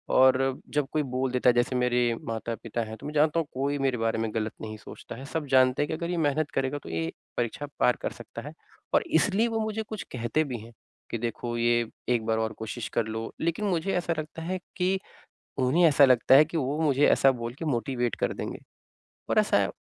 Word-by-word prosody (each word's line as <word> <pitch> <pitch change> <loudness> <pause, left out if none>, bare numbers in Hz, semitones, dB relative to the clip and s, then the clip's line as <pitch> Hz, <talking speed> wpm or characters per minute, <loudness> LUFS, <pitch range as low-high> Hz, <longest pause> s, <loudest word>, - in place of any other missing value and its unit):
और 130 0 +4
जब 145 -2 +1
कोई 155 -1 +1
बोल 130 -1 -1
देता 125 0 +3
है - - +5
जैसे 120 +2 +1
मेरे 125 -1 +2
माता-पिता 115 0 -4
हैं 110 0 -7
तो 140 - -12
मैं 150 - -5
जानता 155 +2 +3
हूँ 160 - -2
कोई 140 +2 -1
मेरे 130 -2 +1
बारे 115 0 0
में 110 -1 -2
गलत 110 -1 -1
नहीं 110 0 -6
सोचता 110 - -10
है, 130 +3 -9
सब 155 +2 -3
जानते 130 +1 +4
हैं 145 - +1
कि - - -3
अगर 170 +1 -3
ये 175 - -1
मेहनत 150 -1 +1
करेगा 135 +2 0
तो - - -9
ये 80 0 -2 0.3
परीक्षा 120 +4 -2
पार 125 - +4
कर - - -2
सकता - - -9
है - - -8 0.4
और - - +4 0.2
इसलिए 205 +6 +2
वो 225 -1 -1
मुझे 220 0 -2
कुछ 215 -1 -6
कहते 120 +5 0
भी 130 -5 -4
हैं 115 +2 -12 0.4
कि, - - -1
"देखो 120 +1 -3
ये 120 0 +2 0.2
एक 120 -3 +1
बार 110 0 +1
और 110 0 -1
कोशिश 110 +1 -4
कर 115 - +3
लो," 110 +1 -4
लेकिन 170 +6 0
मुझे 190 0 0
ऐसा 170 -1 0
लगता 155 +1 -6
है 185 +3 -3 0.2
कि 190 +1 +1 0.6
उन्हें 135 +7 +3
ऐसा 140 -1 +6
लगता 130 0 +5
है 150 +3 +8
कि 165 +2 -4
वो 145 +1 -1
मुझे 145 -2 +4
ऐसा 135 - +5
बोल 120 -1 -5
के 165 - -6
मोटिवेट 125 -3 -1
कर - - 0
देंगे। - - -5 0.7
और - - +4
ऐसा - - +3
130 Hz, 225 wpm, -27 LUFS, 120-155 Hz, 0.7 s, है